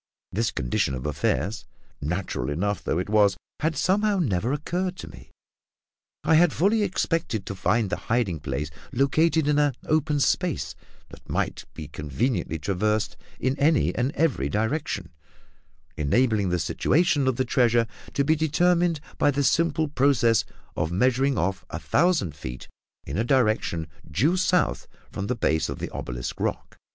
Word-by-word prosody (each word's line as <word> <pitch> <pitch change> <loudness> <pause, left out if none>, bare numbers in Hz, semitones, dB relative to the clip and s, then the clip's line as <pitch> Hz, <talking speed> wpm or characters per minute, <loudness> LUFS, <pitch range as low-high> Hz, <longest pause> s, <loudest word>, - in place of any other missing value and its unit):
This 110 +3 0
condition 60 -1 -1
of 65 - -6
affairs, 80 +7 -1 0.4
natural 75 -5 -2
enough 100 +7 -1
though - - 0
it 90 - -2
was, 105 -2 +3 0.2
had 160 0 0
somehow 205 +2 +2
never 120 - 0
occurred 180 +5 -2
to - - -8
me; - - -13 0.9
I - - +3
had 165 +1 +6
fully 210 +5 +2
expected 165 - -1
to - - -4
find 100 +2 0
the - - 0
hiding 110 -9 +1
place 75 +1 -3 0.2
located 155 +4 +2
in 150 0 +3
an 145 -4 +2
open 155 -1 +1
space 175 +3 0 0.4
that - - -15
might - - -2
be 75 - -7
conveniently 80 - -2
traversed 100 +4 -1 0.2
in 130 +2 0
any 150 +1 +3
and 125 +3 0
every 125 - +1
direction, 110 - -2 0.9
enabling 105 - +2
the 90 - +1
situation 145 - +2
of 130 - +2
the 130 - 0
treasure 120 -2 +3 0.3
to 140 - +2
be 155 +3 +3
determined 170 +2 +2 0.2
by - - +4
the 145 0 +1
simple 160 +1 +2
process 130 -5 +3 0.3
of 80 - -1
measuring 130 +7 +2
off 95 +3 -1
a - - -4
thousand 160 - +1
feet 65 -3 -7 0.4
in - - -3
a - - +2
direction 110 - +1 0.2
due 125 - +2
south 185 -1 +1 0.2
from 100 - -4
the 125 - 0
base 80 -8 +1
of - - -4
the - - -5
obelisk - - -5
rock. - - -3
120 Hz, 155 wpm, -25 LUFS, 95-155 Hz, 0.9 s, had